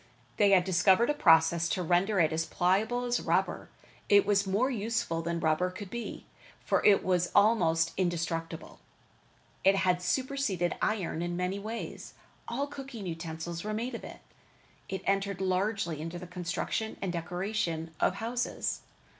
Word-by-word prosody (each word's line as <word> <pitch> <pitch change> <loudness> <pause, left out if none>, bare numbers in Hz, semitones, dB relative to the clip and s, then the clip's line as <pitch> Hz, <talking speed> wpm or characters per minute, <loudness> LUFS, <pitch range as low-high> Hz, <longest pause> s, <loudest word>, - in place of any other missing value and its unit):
They 205 - +5
had 190 -2 +5
discovered 190 +7 +4
a - - 0
process 165 - +4
to 185 - -1
render 180 +4 +2
it 160 -1 +3
as 165 0 -1
pliable 215 +7 +1
as 245 0 0
rubber. - - 0 0.4
It 205 -1 +6
was 200 -1 +2
more 220 +8 +1
useful 220 -7 -1
than 170 +1 -2
rubber 160 +3 +1
could 185 +1 -9
be, 235 0 -6 0.4
for - - +1
it 200 -2 +5
was 180 -1 +1
almost 165 -7 +3
indestructible. 165 -2 -3 0.8
It 195 +1 +5
had 185 -2 +1
superceded 195 -3 -1
iron 190 -6 -1
in 175 0 -2
many 180 +2 -1
ways. 220 +3 -6 0.3
All 270 +4 -1
cooking 270 -7 -8
utensils 165 0 -5
were 215 0 -3
made 240 +4 -3
of 230 - -6
it. - - -10 0.7
It 190 - -4
entered 195 0 0
largely 190 -3 -1
into 165 +2 -5
the 175 - -8
construction 180 +5 -3
and 185 -3 -3
decoration 175 -1 -3
of 185 - +2
houses. 235 +3 -2
185 Hz, 155 wpm, -30 LUFS, 170-215 Hz, 0.8 s, It